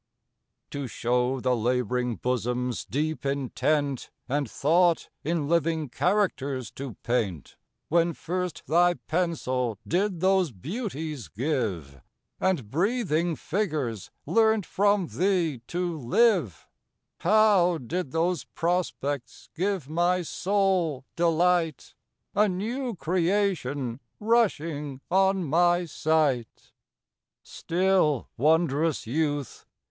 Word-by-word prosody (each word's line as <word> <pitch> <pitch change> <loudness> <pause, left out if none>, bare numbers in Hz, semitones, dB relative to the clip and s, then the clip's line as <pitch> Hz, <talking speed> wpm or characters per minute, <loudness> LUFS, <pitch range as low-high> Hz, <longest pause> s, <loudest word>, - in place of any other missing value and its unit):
TO 140 -2 -4
show 125 +3 0
the 125 0 +1
lab'ring 125 +1 0
bosom's 125 0 -2
deep 155 +4 -2
intent, 140 +1 -1 0.2
And 140 -1 -1
thought 170 +6 +2
in 160 -2 -1
living 165 -2 +1
characters 140 - 0
to 135 -6 -7
paint, 105 - -2 0.3
When 170 +1 +2
first 180 0 -4
thy 175 +2 +4
pencil 130 - -1
did 185 0 0
those 190 -3 +3
beauties 155 - -5
give, 100 - -3 0.4
And 155 - 0
breathing 175 - +1
figures 150 - -2 0.2
learnt 220 -3 +3
from 200 -1 +2
thee 170 -6 0
to 175 -2 -2
live, 150 - +2 0.5
How 195 -3 +4
did 155 +3 -4
those 170 +1 0
prospects 165 -6 -2
give 185 -4 -1
my 175 +3 +1
soul 185 -7 0
delight, 170 -2 +1 0.4
A 210 +1 +3
new 230 +6 -3
creation 165 - 0 0.2
rushing 165 - 0
on 190 0 +3
my 175 +3 +3
sight? 150 -7 0 0.7
Still, 180 -6 +1
wond'rous 155 +2 +2
youth! 145 +1 -2
160 Hz, 95 wpm, -27 LUFS, 130-180 Hz, 0.7 s, thy